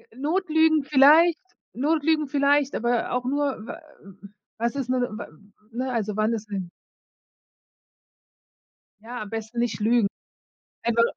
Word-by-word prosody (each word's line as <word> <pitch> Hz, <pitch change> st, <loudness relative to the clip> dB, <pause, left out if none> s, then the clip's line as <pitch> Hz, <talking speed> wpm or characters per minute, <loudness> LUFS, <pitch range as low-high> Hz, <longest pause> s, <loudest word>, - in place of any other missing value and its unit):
Notlügen 315 Hz, 0 st, +2 dB
vielleicht 300 Hz, +5 st, +5 dB, 0.3 s
Notlügen 305 Hz, +3 st, +1 dB
vielleicht, 280 Hz, 0 st, +2 dB
aber 240 Hz, 0 st, 0 dB
auch 250 Hz, 0 st, -1 dB
nur, 275 Hz, -4 st, -1 dB
w -, -, -6 dB, 0.8 s
was 235 Hz, +3 st, -1 dB
ist 265 Hz, -3 st, -3 dB
'ne, 255 Hz, -, +1 dB
w 225 Hz, -2 st, -3 dB, 0.5 s
ne, 255 Hz, +3 st, -3 dB
also 215 Hz, -3 st, -2 dB
wann 215 Hz, +2 st, +1 dB
ist 215 Hz, -2 st, -5 dB
denn 190 Hz, -3 st, -4 dB, 2.3 s
Ja, 240 Hz, +3 st, -7 dB
am 210 Hz, -, -10 dB
besten 225 Hz, +2 st, -5 dB
nicht 235 Hz, -3 st, -1 dB
lügen. 225 Hz, 0 st, +3 dB, 0.8 s
Einfach 235 Hz, 0 st, +2 dB
250 Hz, 125 wpm, -24 LUFS, 225-290 Hz, 2.3 s, vielleicht